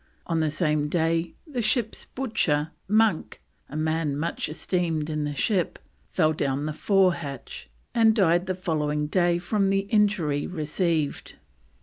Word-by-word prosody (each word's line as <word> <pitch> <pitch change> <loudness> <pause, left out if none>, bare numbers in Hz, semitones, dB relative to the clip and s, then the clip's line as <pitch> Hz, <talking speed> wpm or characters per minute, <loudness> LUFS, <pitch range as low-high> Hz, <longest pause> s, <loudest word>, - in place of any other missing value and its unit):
On 165 -2 0
the 155 -1 +1
same 150 -2 0
day 165 +1 0
the 275 -7 -3
ship's 220 0 0
butcher, 165 - -1 0.2
Monk, 215 -3 +2 0.3
"a - - -8
man 155 -2 0
much 160 0 -2
esteemed 160 -1 -1
in 150 -1 -1
the 145 0 -3
ship," 185 +3 0 0.3
fell 155 -3 +2
down 140 -1 -1
the 155 - -2
forehatch, 170 - 0 0.2
and 225 -2 +4
died 180 -3 +3
the 185 - -1
following 150 -4 -1
day 175 +2 +2
from 195 +3 0
the 195 0 +2
injury 200 -10 +2
received. 160 -2 -2
165 Hz, 140 wpm, -26 LUFS, 150-195 Hz, 0.3 s, and